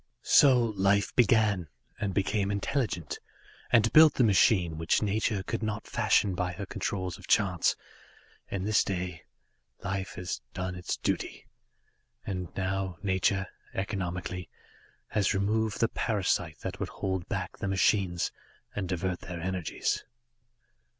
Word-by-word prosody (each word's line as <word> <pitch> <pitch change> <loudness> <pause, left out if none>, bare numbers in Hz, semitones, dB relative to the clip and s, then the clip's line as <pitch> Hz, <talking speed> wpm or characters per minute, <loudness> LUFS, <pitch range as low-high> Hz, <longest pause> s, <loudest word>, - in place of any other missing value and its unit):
"So 135 -4 +6
life 100 -2 +1
began, 110 -7 +3 0.3
and 105 -2 -1
became 100 +1 0
intelligent, 100 - -2 0.5
and 115 0 +4
built 155 0 +8
the 130 - +3
machine 90 -5 +4
which 80 +6 +2
nature 105 -1 0
could - - -3
not 110 -1 -3
fashion 100 -3 +2
by 90 0 -1
her 95 +4 -5
Controls 95 -1 -3
of 90 - -13
Chance, 95 -6 +3 0.7
and 95 -1 -3
this 110 0 +4
day 90 -3 -4 0.6
Life 95 -1 -3
has 90 0 -4
done 90 0 -3
its 90 0 -3
duty, - - -2 0.8
and 90 -2 -3
now 95 -2 -2
Nature, 95 0 +1 0.3
economically, 90 -2 -3 0.6
has 100 -3 +1
removed 105 +2 0
the 115 - +4
parasite 90 - 0
that - - -5
would - - -3
hold 95 -2 -3
back - - -3
the - - -2
machines 95 -2 +2 0.4
and 95 -3 -3
divert 90 0 -1
their 90 -2 -7
energies. 90 -1 -2
95 Hz, 130 wpm, -29 LUFS, 90-105 Hz, 0.8 s, built